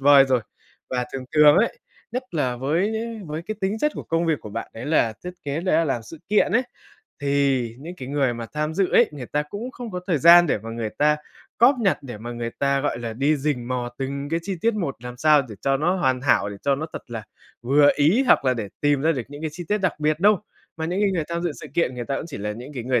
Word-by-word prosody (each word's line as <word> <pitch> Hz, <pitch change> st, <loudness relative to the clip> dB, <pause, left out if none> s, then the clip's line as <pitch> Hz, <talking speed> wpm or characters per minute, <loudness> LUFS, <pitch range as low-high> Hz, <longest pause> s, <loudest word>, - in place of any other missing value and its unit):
vời 140 Hz, 0 st, +7 dB
rồi. 130 Hz, -2 st, +2 dB, 0.5 s
Và 125 Hz, -1 st, 0 dB
thường 130 Hz, -1 st, -5 dB
thường 150 Hz, 0 st, +7 dB
ấy, 230 Hz, -, +2 dB, 0.3 s
nhất 250 Hz, +1 st, -2 dB
là 130 Hz, -7 st, 0 dB
với 165 Hz, -, 0 dB, 0.3 s
với 155 Hz, +2 st, -5 dB
cái 215 Hz, +4 st, -4 dB
tính 195 Hz, +3 st, -1 dB
chất 300 Hz, +5 st, +1 dB
của -, -, -5 dB
công 165 Hz, +1 st, 0 dB
việc 160 Hz, -3 st, +1 dB
của 105 Hz, -, -9 dB
bạn 115 Hz, +2 st, -5 dB
đấy 115 Hz, +5 st, -7 dB
là 130 Hz, -8 st, +2 dB
thiết 180 Hz, -, -5 dB
kế, 145 Hz, +3 st, -2 dB
đấy 185 Hz, -3 st, +1 dB
là 165 Hz, -, +3 dB
làm 135 Hz, -6 st, -1 dB
sự 155 Hz, +8 st, -11 dB
kiện 210 Hz, +1 st, +3 dB
ấy, 245 Hz, +3 st, +4 dB, 0.6 s
thì 135 Hz, -4 st, +1 dB
những 170 Hz, +4 st, -8 dB
cái 130 Hz, -5 st, -7 dB
người 135 Hz, -3 st, +1 dB
mà 115 Hz, -1 st, -6 dB
tham 150 Hz, +1 st, -1 dB
dự 190 Hz, -1 st, +1 dB
ấy, 240 Hz, -, +6 dB
người 135 Hz, -4 st, -7 dB
ta 150 Hz, +4 st, -1 dB
cũng 205 Hz, +11 st, -6 dB
không 245 Hz, -3 st, -8 dB
có 180 Hz, -2 st, -4 dB
thời 165 Hz, -6 st, +1 dB
gian 170 Hz, +3 st, +8 dB
để 140 Hz, -, +1 dB
mà 110 Hz, +2 st, -8 dB
người 115 Hz, -1 st, -3 dB
ta 150 Hz, +1 st, +4 dB, 0.4 s
cóp 250 Hz, +5 st, +6 dB
nhặt, 195 Hz, -4 st, +2 dB
để 120 Hz, -6 st, -8 dB
mà 120 Hz, +2 st, -6 dB
người 120 Hz, 0 st, -4 dB
ta, 140 Hz, 0 st, +2 dB
gọi 145 Hz, -4 st, -1 dB
là, 115 Hz, -2 st, -4 dB
đi 140 Hz, +6 st, +1 dB
rình 135 Hz, -4 st, -2 dB
mò 125 Hz, -1 st, -2 dB
từng 140 Hz, +1 st, -3 dB
cái 165 Hz, -, 0 dB
chi 190 Hz, 0 st, -3 dB
tiết 230 Hz, -1 st, +2 dB
một 170 Hz, -10 st, -2 dB
làm 125 Hz, 0 st, -7 dB
sao 150 Hz, +1 st, +5 dB
để 105 Hz, -, -8 dB
cho 135 Hz, 0 st, +2 dB
nó 170 Hz, +7 st, +1 dB
hoàn 130 Hz, -8 st, +1 dB
hảo, 125 Hz, -6 st, +2 dB
để 100 Hz, -, -7 dB
cho 140 Hz, -1 st, +2 dB
nó 155 Hz, +3 st, -4 dB
thật -, -, -6 dB
là 115 Hz, -2 st, -5 dB, 0.4 s
vừa 145 Hz, +3 st, +5 dB
ý 170 Hz, -, +4 dB
hoặc -, -, +5 dB
là 130 Hz, -1 st, +3 dB
để 110 Hz, -4 st, -4 dB
tìm 145 Hz, -2 st, +2 dB
ra 165 Hz, +2 st, +3 dB
được 130 Hz, -5 st, -3 dB
những 145 Hz, +1 st, -10 dB
cái 155 Hz, -, -2 dB
chi 175 Hz, +3 st, -7 dB
tiết 210 Hz, -, +2 dB
đặc 185 Hz, -5 st, -1 dB
biệt 155 Hz, +1 st, +1 dB
đâu. 205 Hz, 0 st, +5 dB, 0.4 s
Mà 160 Hz, -, -3 dB
những 180 Hz, +4 st, -1 dB
cái 200 Hz, -, +3 dB
người 165 Hz, -4 st, -1 dB
tham 170 Hz, 0 st, -2 dB
dự 175 Hz, -, -1 dB
sự -, -, -10 dB
kiện, 170 Hz, -7 st, +1 dB
người 120 Hz, -1 st, -4 dB
ta 135 Hz, -, -2 dB
cũng -, -, -5 dB
chỉ 150 Hz, -, -7 dB
là 105 Hz, +1 st, -3 dB
những 125 Hz, +7 st, -9 dB
cái 120 Hz, -, -5 dB
người 125 Hz, -1 st, +2 dB
145 Hz, 275 wpm, -23 LUFS, 125-170 Hz, 0.6 s, gian